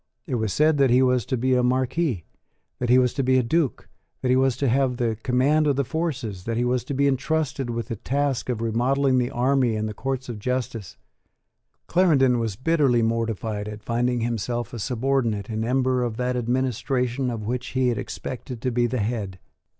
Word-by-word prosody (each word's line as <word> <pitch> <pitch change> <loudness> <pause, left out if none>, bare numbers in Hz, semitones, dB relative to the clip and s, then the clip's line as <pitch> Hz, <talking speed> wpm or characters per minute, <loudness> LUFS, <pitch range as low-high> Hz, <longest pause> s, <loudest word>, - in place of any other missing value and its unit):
It - - -5
was 110 -4 0
said 155 +4 +3
that 135 -2 +5
he 125 +2 +5
was 125 -4 +2
to 130 - 0
be 130 +2 +1
a 125 - +3
Marquess, 130 - 0 0.6
that 125 - -2
he 125 - +6
was 125 -1 +3
to 140 - -1
be 130 0 +3
a 130 - +3
Duke, 145 +3 0 0.4
that 130 - +1
he 125 - +4
was 130 -2 +2
to 140 - 0
have 130 0 +2
the 115 -3 0
command 140 +6 +2
of 140 - +2
the 140 - +1
forces, 130 - -3
that 115 0 -2
he 120 - +1
was 125 0 0
to 140 - -4
be 140 +1 +3
entrusted 140 -1 -1
with 115 +1 -4
the 115 - -3
task 140 +1 -1
of 120 -3 -1
remodelling 130 +4 +2
the 125 0 0
army 125 -1 +1
and 110 0 -1
the 105 - -5
courts 130 +3 -3
of 115 -4 -6
justice. 115 - -3 0.9
Clarendon 140 -9 +3
was 110 -4 -2
bitterly 135 -2 +2
mortified 110 -2 -2
at 105 0 -8
finding 120 +1 0
himself 120 0 -2
a 120 - -5
subordinate 120 -3 -1
in 110 0 -2
ember 130 +1 +1
of 120 -2 -2
that 125 0 -1
administration 125 +1 -1
of 115 -3 -4
which 125 +3 -3
he 130 -1 +1
had 115 -4 -1
expected 125 -1 -6
to 125 - 0
be 120 0 +2
the 125 -1 -2
head. 100 -4 -3
125 Hz, 205 wpm, -24 LUFS, 115-135 Hz, 0.9 s, he